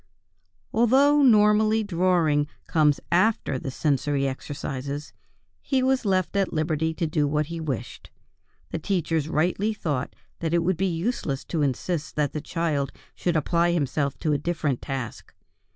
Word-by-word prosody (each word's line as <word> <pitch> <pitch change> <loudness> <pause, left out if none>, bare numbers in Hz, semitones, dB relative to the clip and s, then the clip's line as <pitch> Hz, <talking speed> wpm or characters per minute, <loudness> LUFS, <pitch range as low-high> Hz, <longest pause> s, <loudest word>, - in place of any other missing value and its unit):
Although 270 +6 +5
normally 215 -2 +5
drawing 170 -6 +2 0.2
comes 150 -3 +3
after 185 - +2
the 135 - -5
sensory 140 0 0
exercises, 140 +1 -5 0.5
he 265 -2 0
was 260 -2 +1
left 190 -1 +1
at 195 -1 +1
liberty 155 0 0
to 170 - -1
do 155 -2 +1
what 150 +1 0
he 165 - -4
wished; 145 -7 -5 0.6
the 165 - -2
teachers 165 -4 -1
rightly 180 +7 0
thought 145 -10 -3 0.2
that 165 0 0
it 170 - +2
would 180 0 +1
be 190 +2 +1
useless 165 - -2
to 165 - -2
insist 150 +4 -2
that 150 -2 0
the 150 - -3
child 155 -4 -1 0.2
should 175 -2 -1
apply 170 +2 +2
himself 140 -3 -1
to 155 - 0
a 145 - +1
different 150 -5 -1
task. 135 -4 -6
160 Hz, 150 wpm, -25 LUFS, 145-190 Hz, 0.6 s, Although